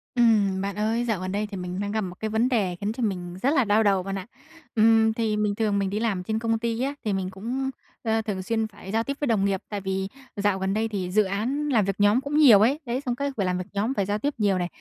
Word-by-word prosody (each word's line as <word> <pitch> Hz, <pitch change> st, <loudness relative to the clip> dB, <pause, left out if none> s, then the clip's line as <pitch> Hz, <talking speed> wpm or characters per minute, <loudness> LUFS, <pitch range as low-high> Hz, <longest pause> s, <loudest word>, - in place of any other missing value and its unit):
Ừm, 210 Hz, -5 st, +3 dB
bạn 200 Hz, 0 st, -3 dB
ơi, 225 Hz, +3 st, 0 dB
dạo 220 Hz, -5 st, 0 dB
gần 185 Hz, 0 st, -3 dB
đây 210 Hz, +2 st, -1 dB
thì 195 Hz, -, -5 dB
mình 180 Hz, 0 st, -4 dB
đang 205 Hz, 0 st, -2 dB
gặp 220 Hz, +1 st, 0 dB
một 180 Hz, -3 st, -5 dB
cái 220 Hz, -, -2 dB
vấn 220 Hz, +3 st, +1 dB
đề 200 Hz, -8 st, +1 dB
khiến 205 Hz, +1 st, -1 dB
cho 245 Hz, -, -4 dB
mình 180 Hz, -4 st, -2 dB
rất 265 Hz, -, +3 dB
là 270 Hz, -5 st, +4 dB
đau 210 Hz, +2 st, +3 dB
đầu 195 Hz, -2 st, +2 dB
bạn 195 Hz, +1 st, -4 dB
ạ. 190 Hz, -, -7 dB, 0.5 s
Ừm, 220 Hz, 0 st, +5 dB
thì 220 Hz, -2 st, 0 dB
mình 210 Hz, -1 st, 0 dB
thường 210 Hz, -2 st, +1 dB
mình 195 Hz, -1 st, 0 dB
đi 205 Hz, +2 st, -2 dB
làm 210 Hz, -5 st, -1 dB
trên 220 Hz, +3 st, -1 dB
công 225 Hz, 0 st, 0 dB
ty 230 Hz, 0 st, -2 dB
á, 275 Hz, +2 st, 0 dB
thì 210 Hz, -, +1 dB
mình 190 Hz, -1 st, -2 dB
cũng, 240 Hz, +8 st, -3 dB, 0.3 s
ơ, 225 Hz, -1 st, +1 dB
thường 205 Hz, -4 st, -4 dB
xuyên 220 Hz, +2 st, 0 dB
phải 205 Hz, -2 st, -10 dB
giao 225 Hz, +2 st, +1 dB
tiếp 275 Hz, +3 st, -4 dB
với 290 Hz, -, -1 dB
đồng 215 Hz, -5 st, +2 dB
nghiệp, 195 Hz, -1 st, 0 dB
tại 205 Hz, -2 st, -4 dB
vì 190 Hz, 0 st, -2 dB, 0.3 s
dạo 200 Hz, -2 st, +1 dB
gần 190 Hz, +1 st, -1 dB
đây 220 Hz, +2 st, 0 dB
thì 190 Hz, -5 st, -3 dB
dự 215 Hz, +3 st, +4 dB
án 235 Hz, +10 st, -2 dB
làm 225 Hz, -7 st, +3 dB
việc 195 Hz, -1 st, -1 dB
nhóm 205 Hz, +5 st, +4 dB
cũng 285 Hz, +2 st, -2 dB
nhiều 255 Hz, -10 st, +8 dB
ấy, 265 Hz, +7 st, +3 dB
đấy, 245 Hz, +2 st, -2 dB
xong 245 Hz, -4 st, -2 dB
cái 280 Hz, +2 st, -2 dB
phải 200 Hz, -, +1 dB
làm 180 Hz, 0 st, 0 dB
việc 180 Hz, 0 st, -5 dB
nhóm, 210 Hz, +6 st, 0 dB
phải 200 Hz, -7 st, 0 dB
giao 205 Hz, +2 st, -1 dB
tiếp 290 Hz, +6 st, -1 dB
nhiều 205 Hz, -4 st, +2 dB
này. 175 Hz, -1 st, -1 dB
210 Hz, 290 wpm, -25 LUFS, 195-230 Hz, 0.5 s, nhiều